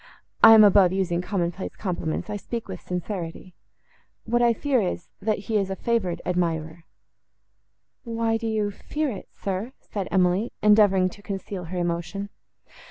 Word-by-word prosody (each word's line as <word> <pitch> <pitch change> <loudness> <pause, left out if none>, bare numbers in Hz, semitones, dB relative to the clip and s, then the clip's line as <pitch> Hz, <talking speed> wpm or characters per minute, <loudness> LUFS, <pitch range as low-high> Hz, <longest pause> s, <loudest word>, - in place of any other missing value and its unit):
I 225 - +11
am 215 - +9
above 195 -3 +6
using 185 -2 0
common 180 -2 -1
place 185 +2 -7
compliments; 170 -5 -3
I 210 - -4
speak 230 +3 -5
with 185 -2 -7
sincerity. 180 -1 -5 0.7
What 240 +1 +1
I 240 -1 +5
fear, 260 +1 +1
is, 180 -3 -3
that 215 +1 0
he 215 +2 -1
is 195 -2 0
a 190 - -2
favoured 205 -6 -1
admirer."—"Why 180 +6 -5
do 225 0 -4
you 215 -2 0
fear 300 +7 -3
it, 200 - -8
sir?" 200 +6 -4
said 200 -3 -5
Emily, 185 +4 +2
endeavouring 205 -3 +5
to 205 - -14
conceal 195 -2 -5
her 180 +3 -5
emotion. 175 +3 -2
195 Hz, 155 wpm, -25 LUFS, 180-220 Hz, 0.7 s, I